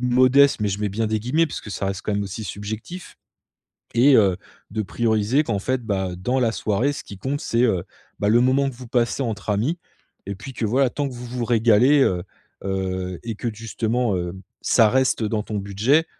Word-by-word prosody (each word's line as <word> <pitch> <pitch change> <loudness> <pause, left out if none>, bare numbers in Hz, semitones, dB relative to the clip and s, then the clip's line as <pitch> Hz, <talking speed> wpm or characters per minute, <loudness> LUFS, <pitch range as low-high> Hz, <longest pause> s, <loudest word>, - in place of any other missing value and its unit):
«modeste» 130 +2 +4
mais, 105 - +1
je 100 +1 -3
mets 105 - 0
bien 110 +3 -1
des 110 0 0
guillemets 150 +9 +2
parce 150 - -6
que 105 - -9
ça 100 - -3
reste 95 0 -3
quand 105 - -2
même 100 - 0
aussi 100 +3 -6
subjectif. 110 - -7 0.8
Et 135 +4 +6
heu, 95 -4 +4 0.4
de 110 0 -1
prioriser 110 +6 +1
qu'en 105 -7 -1
fait, 130 +4 -1
bah, 95 -4 -1
dans 125 +9 0
la 120 -3 +2
soirée 115 +6 0
ce - - -7
qui 100 - -10
compte 135 +8 -2
c'est, 115 +1 0
heu, 95 -7 +1 0.4
bah, 105 - +2
le 115 +3 +5
moment 130 +2 +3
que 130 - -13
vous 125 -1 -10
passez 120 +2 +1
entre 110 -4 -3
amis. 120 - 0 0.5
Et 100 - -3
puis 105 +8 -9
que 115 - -3
voilà, 130 +4 +2
tant 145 +2 -2
que 130 - -9
vous 120 0 -8
vous 120 0 -3
régalez, 120 +4 +4
heu, 90 -7 +1 0.4
heu, 95 -2 -3
et 115 - -3
que 120 - -5
d 110 - -5
justement, 115 0 -1
heu, 90 0 -3 0.3
ça 110 -2 +4
reste 130 -1 +2
dans 105 0 -1
ton 105 -1 -3
budget. 110 +11 +2
115 Hz, 220 wpm, -23 LUFS, 100-130 Hz, 0.8 s, Et